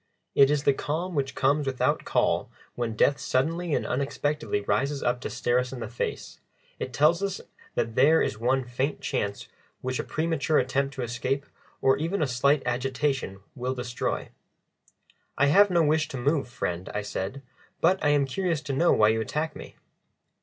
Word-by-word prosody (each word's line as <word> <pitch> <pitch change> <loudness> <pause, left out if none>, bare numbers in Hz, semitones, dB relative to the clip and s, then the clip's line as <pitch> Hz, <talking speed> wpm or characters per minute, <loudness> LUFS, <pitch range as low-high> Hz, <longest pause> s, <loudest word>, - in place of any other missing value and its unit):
It 140 -1 +6
is 145 -1 +1
the 140 - +4
calm 165 +7 -3
which 140 -3 -1
comes 140 +2 +2
without 130 -1 0
call - - +1 0.2
when 115 -2 -3
death 140 +5 +3
suddenly 165 +4 0
and - - -1
unexpectedly 140 -4 -1
rises 135 +8 0
up 120 0 0
to - - -4
stare 120 +1 +1
us 125 0 -3
in 130 - -6
the 115 - -4
face; 120 +2 -5 0.4
it 130 - -4
tells 155 +7 +3
us 195 -1 -2 0.4
that 115 -1 -1
there 150 +7 +5
is 105 - -1
one 130 +3 +1
faint 130 +4 -2
chance 100 0 -2 0.3
which 130 0 -2
a - - -1
premature 160 -1 0
attempt 135 +2 0
to 130 - -3
escape 125 +4 -2 0.4
or 135 - +5
even 165 +7 -1
a - - +1
slight 135 +3 +2
agitation 125 -4 -1
will 130 +1 -3
destroy. 125 -1 -3 1.1
"I 140 - +4
have 205 +1 +7
no 170 -2 +3
wish 155 +1 +2
to 135 - -6
move, 140 +1 0
friend," 90 -7 -4
I 105 - -1
said, 100 +7 -4 0.4
"but 185 +3 +3
I 150 - +4
am 145 -1 +3
curious 165 +2 -1
to 150 -3 -4
know 170 +6 +3
why 105 0 +5
you 110 0 +1
attack 150 +8 -2
me?" - - -10
135 Hz, 180 wpm, -27 LUFS, 125-150 Hz, 1.1 s, have